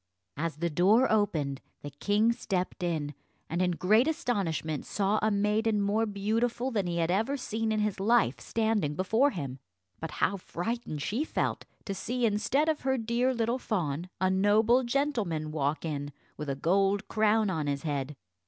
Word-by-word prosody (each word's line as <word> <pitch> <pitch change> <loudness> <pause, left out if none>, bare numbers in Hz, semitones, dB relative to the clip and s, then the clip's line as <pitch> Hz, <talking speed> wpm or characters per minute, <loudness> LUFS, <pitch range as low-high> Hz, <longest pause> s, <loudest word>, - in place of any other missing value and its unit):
As 165 0 -2
the 170 +3 -1
door 205 - +4
opened, 155 -11 0 0.2
the 145 - -6
king 205 +10 +2
stepped 190 -5 -3
in, 155 -4 -2 0.3
and 170 +3 -1
in 180 - +3
great 215 - +3
astonishment 185 - -1
saw 205 +1 0
a 215 - +2
maiden 210 +1 +1
more 210 +3 +1
beautiful 230 +5 -1
than 205 -6 0
he 170 -1 -2
had 165 0 +1
ever 225 +9 +1
seen 225 -3 -2
in 215 -1 +1
his 210 -2 -1
life 200 - +3
standing 215 - 0
before 220 - +3
him. 135 - -5 0.4
But 160 - -4
how 200 - +1
frightened 180 -4 -4
she 230 - -1
felt - - -2 0.2
to 200 - -3
see 240 +5 -1
instead 225 +8 +1
of 315 -2 0
her 265 0 +1
dear 235 +3 +1
little 235 0 0
fawn 175 - -2
a 185 0 +2
noble 210 +6 +4
gentleman 230 - -1
walk 150 +1 -1
in 145 -2 -3 0.2
with 150 -1 -5
a 135 - -1
gold 195 +7 +1
crown 215 -1 +2
on 155 -4 -2
his 140 -1 -2
head. 145 -2 -2
200 Hz, 170 wpm, -29 LUFS, 165-225 Hz, 0.4 s, door